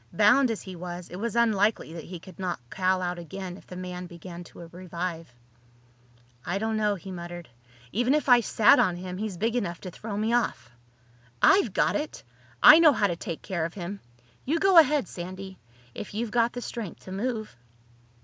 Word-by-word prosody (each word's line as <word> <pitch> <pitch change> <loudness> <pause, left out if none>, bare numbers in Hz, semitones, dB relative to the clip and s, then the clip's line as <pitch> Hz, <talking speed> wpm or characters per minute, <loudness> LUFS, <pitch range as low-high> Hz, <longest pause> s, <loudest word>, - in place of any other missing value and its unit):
Bound 225 +5 +5
as 225 - -3
he 190 -1 -8
was, 175 0 -7
it 180 - -7
was 230 +2 -3
unlikely 215 -6 +2
that 165 -2 -8
he 180 - -7
could 180 +2 -14
knock 180 -5 -2
Cal 185 0 +1
out 175 0 -3
again 185 +1 -7
if - - -16
the 180 - -9
man 180 0 -6
began 175 0 -9
to 170 0 -12
revive. 170 -3 -6 1.1
"I 175 +7 -2
don't 220 +2 -1
know," 210 -1 +1
he 190 +1 -9
muttered. 175 -1 -7 0.4
"Even 245 +7 +2
if 300 - -1
I 245 -2 +7
sat 225 0 +5
on 185 -8 +3
him, 180 +1 -6
he's 210 -4 -4
big 225 +5 0
enough 175 -8 -2
to 185 - -7
throw 205 +3 -6
me 220 +2 0
off. 235 - -1 0.7
I've 390 +1 +5
got - - +1
it! 300 +1 -4 0.4
I 310 +2 +11
know 315 -3 +7
how 210 - +1
to 175 -4 0
take 170 -1 -6
care 175 -4 -2
of 165 +1 -4
him. 195 +1 -6 0.4
You 310 +5 0
go 380 0 +7
ahead, 300 -2 +3
Sandy—if 180 - -9
you've 225 0 -2
got 235 0 +2
the 245 - -5
strength 225 -7 -6
to 185 - -10
move." 215 - -3
190 Hz, 195 wpm, -27 LUFS, 175-230 Hz, 1.1 s, I